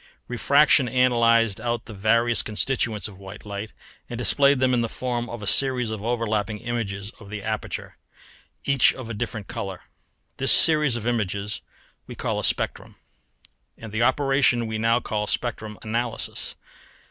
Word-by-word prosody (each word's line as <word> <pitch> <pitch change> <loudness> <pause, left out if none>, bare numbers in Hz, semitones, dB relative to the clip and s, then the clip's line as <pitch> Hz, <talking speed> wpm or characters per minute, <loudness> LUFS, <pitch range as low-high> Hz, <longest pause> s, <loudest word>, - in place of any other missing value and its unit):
Refraction 140 +2 +4
analysed 115 -4 +3
out 120 -1 -2
the 110 - -9
various 115 +4 +2
constituents 110 -1 -1
of 100 -3 -13
white 100 +2 -11
light 100 +1 -6 0.4
and 120 - -5
displayed 140 +3 +3
them 130 0 +2
in 120 - +2
the 115 - -2
form 120 -1 -3
of 120 -2 -7
a - - -4
series 125 0 +2
of 110 -2 -5
overlapping 110 -2 -1
images 105 -4 -4
of 105 -3 -13
the 105 -1 -6
aperture, 110 0 -4 0.7
each 140 -2 +4
of 120 -3 -7
a - - -3
different 110 -1 -5
colour; 95 -3 -6 0.6
this - - +4
series 150 -5 +6
of 115 -2 -4
images 105 -3 -2 0.5
we - - -8
call - - -2
a - - -4
spectrum, - - 0 0.8
and 110 -2 -9
the 110 +2 -2
operation 130 -1 +2
we 110 -1 -3
now 115 +2 +3
call 105 -3 -3
spectrum 110 -3 -3
analysis. 115 +1 -2
115 Hz, 160 wpm, -24 LUFS, 105-125 Hz, 0.8 s, series